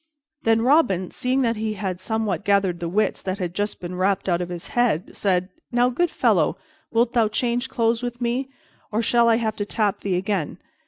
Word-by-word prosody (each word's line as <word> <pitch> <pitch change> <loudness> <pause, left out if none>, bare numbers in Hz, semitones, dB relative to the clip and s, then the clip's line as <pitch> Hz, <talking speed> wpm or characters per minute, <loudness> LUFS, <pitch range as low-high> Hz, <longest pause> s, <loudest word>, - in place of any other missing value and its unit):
Then 225 0 +2
Robin, 245 - +3
seeing 260 +1 0
that 230 -2 +1
he 215 0 -2
had 190 -3 -3
somewhat 215 -3 -2
gathered 195 -3 +2
the 170 -1 -3
wits 210 +5 0
that 190 0 -3
had 180 -3 -3
just 205 +2 -2
been 175 0 -6
rapped 190 +2 0
out 175 -1 +1
of 175 - -4
his 175 -1 -6
head, 235 -9 0
said, 185 -2 +1 0.2
"Now, 245 0 +3
good 345 +7 +1
fellow, - - +2 0.3
wilt 235 +1 +1
thou 230 -3 +3
change 245 +3 -1
clothes 230 -2 +1
with 245 0 -4
me, 245 +2 -1 0.4
or 220 +2 0
shall 235 +1 +4
I 225 - +5
have 220 -2 -1
to 205 - -1
tap 205 -1 0
thee 195 -2 -1
again? 185 -3 -2
215 Hz, 205 wpm, -23 LUFS, 185-235 Hz, 0.4 s, I